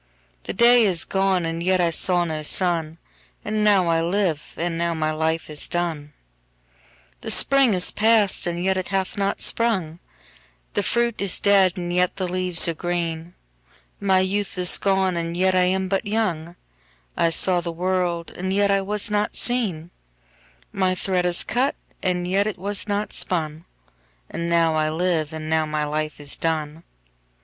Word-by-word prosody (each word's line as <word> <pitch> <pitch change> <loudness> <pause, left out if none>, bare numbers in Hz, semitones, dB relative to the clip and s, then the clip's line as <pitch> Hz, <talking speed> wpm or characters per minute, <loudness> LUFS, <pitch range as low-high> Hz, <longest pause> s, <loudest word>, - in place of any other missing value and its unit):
5The - - -6
day 240 +1 +6
is 180 -5 0
gone 190 -2 0
and 165 0 -3
yet 185 +1 +1
I 170 -1 +2
saw 175 +1 +2
no 155 -2 -3
sun,6And 170 +5 -2
now 200 -4 +4
I 165 -1 +2
live, 170 -3 -1
and 170 0 -2
now 170 0 -1
my 155 -1 -1
life 160 +1 -1
is 150 -1 -4
done.7The 60 - -7
spring 270 -6 +5
is 180 - +2
past, 215 -4 +2
and 175 0 -3
yet 190 0 +1
it 185 - -3
hath 195 -1 -2
not 200 -1 -1
sprung,8The 195 -1 -4
fruit 235 -1 0
is 200 -3 +1
dead, 195 -3 +3
and 175 -1 -4
yet 180 0 +1
the 185 -2 -3
leaves 180 -2 +3
are 170 - 0
green,9My 175 - -3
youth 200 0 -2
is 180 -1 +1
gone, 190 -2 +1
and 170 0 -3
yet 185 +1 +2
I 185 0 +3
am 190 +1 0
but 195 +2 -2
young,10I 155 - -4
saw 180 +2 +2
the 170 0 -4
world, 175 -1 -2
and 185 +1 -3
yet 200 +1 +2
I 195 0 +2
was 210 +2 -3
not 210 0 -1
seen,11My 165 - -4
thread 180 -1 0
is 175 -1 0
cut, 250 +5 0 0.3
and 180 -1 -1
yet 195 +3 +1
it 215 - -4
was 200 +3 -3
not 205 0 -2
spun,12And 155 - -5
now 165 -1 +2
I 155 0 0
live, 160 -1 -1
and 155 -1 -6
now 160 0 +1
my 150 0 -2
life 155 +1 -3
is 145 -1 -6
done. 160 0 -3
175 Hz, 160 wpm, -22 LUFS, 160-195 Hz, 0.3 s, day